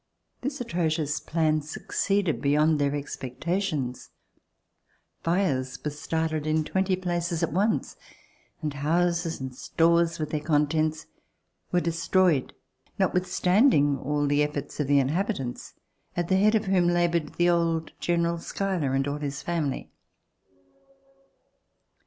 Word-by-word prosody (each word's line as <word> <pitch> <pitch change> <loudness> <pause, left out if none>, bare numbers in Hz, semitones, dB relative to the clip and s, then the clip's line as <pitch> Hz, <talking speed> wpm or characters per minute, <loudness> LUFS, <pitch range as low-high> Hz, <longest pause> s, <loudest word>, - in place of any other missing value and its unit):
This 280 +3 -3
atrocious 160 - -1
plan 155 -1 +1
succeeded 180 +4 -1
beyond 150 +2 +3
their 140 0 +1
expectations. 145 +1 -3 1.1
Fires 140 -8 0
were 150 - 0
started 155 +1 -2
in 155 0 +2
twenty 190 +3 0
places 175 -2 -2
at 165 - -1
once, 205 +5 0 0.7
and 150 -2 -1
houses 170 +3 0
and 130 -1 -5
stores, 170 +5 +2
with 155 -1 -4
their 155 - 0
contents, 155 +1 +1 0.7
were 180 - +3
destroyed, 170 -3 +2 0.5
notwithstanding 180 - +3 0.3
the 145 +1 +2
efi"orts 150 0 -4
of 150 - 0
the 145 0 +4
inhabitants, 140 - -1 0.4
at 175 -1 -1
the 190 - +4
head 215 +3 +4
of 220 0 +1
whom 185 -2 +3
labored 170 -2 +1
the 175 0 +3
old 165 -2 0
General 170 -1 0
Schuyler, 175 -6 -2
and 135 +1 +1
all 145 +1 -2
his 140 -1 -4
family. 160 -6 -2
165 Hz, 120 wpm, -26 LUFS, 145-175 Hz, 1.1 s, the